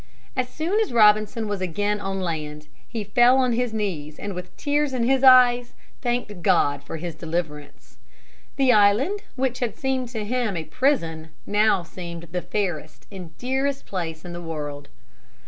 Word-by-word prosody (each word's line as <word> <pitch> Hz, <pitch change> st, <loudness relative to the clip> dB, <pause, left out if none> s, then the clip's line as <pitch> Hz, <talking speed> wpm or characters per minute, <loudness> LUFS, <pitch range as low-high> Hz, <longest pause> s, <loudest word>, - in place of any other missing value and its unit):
As 255 Hz, -1 st, -1 dB
soon 345 Hz, +7 st, -1 dB
as 440 Hz, -, 0 dB
Robinson 215 Hz, 0 st, +4 dB
was 205 Hz, -2 st, -3 dB
again 205 Hz, +4 st, -1 dB
on 195 Hz, -1 st, -3 dB
land 150 Hz, -3 st, -4 dB, 0.2 s
he 225 Hz, -3 st, -4 dB
fell 240 Hz, +5 st, +4 dB
on 255 Hz, -2 st, +2 dB
his 245 Hz, 0 st, 0 dB
knees 170 Hz, -9 st, -3 dB
and 205 Hz, -1 st, -5 dB
with 180 Hz, 0 st, -9 dB
tears 290 Hz, -1 st, 0 dB
in 250 Hz, -2 st, 0 dB
his 265 Hz, +2 st, +2 dB
eyes 245 Hz, -2 st, +6 dB, 0.3 s
thanked 240 Hz, -6 st, -2 dB
God 145 Hz, -3 st, +2 dB
for 155 Hz, -, -6 dB
his 170 Hz, +1 st, -5 dB
deliverance. 155 Hz, -3 st, -6 dB, 0.6 s
The 265 Hz, -3 st, +4 dB
island 215 Hz, -, +4 dB, 0.2 s
which 255 Hz, -1 st, -1 dB
had 230 Hz, -4 st, -2 dB
seemed 260 Hz, -2 st, -1 dB
to 220 Hz, -3 st, -4 dB
him 230 Hz, -4 st, -1 dB
a 160 Hz, -, -3 dB
prison 165 Hz, -, 0 dB, 0.2 s
now 210 Hz, -3 st, +2 dB
seemed 170 Hz, -1 st, -8 dB
the 180 Hz, +1 st, -2 dB
fairest 175 Hz, -4 st, -4 dB
and 180 Hz, -5 st, -10 dB
dearest 270 Hz, +2 st, -1 dB
place 165 Hz, -4 st, -5 dB
in 175 Hz, -, -7 dB
the 175 Hz, -, -6 dB
world. 145 Hz, -3 st, -6 dB
205 Hz, 165 wpm, -24 LUFS, 170-250 Hz, 0.6 s, eyes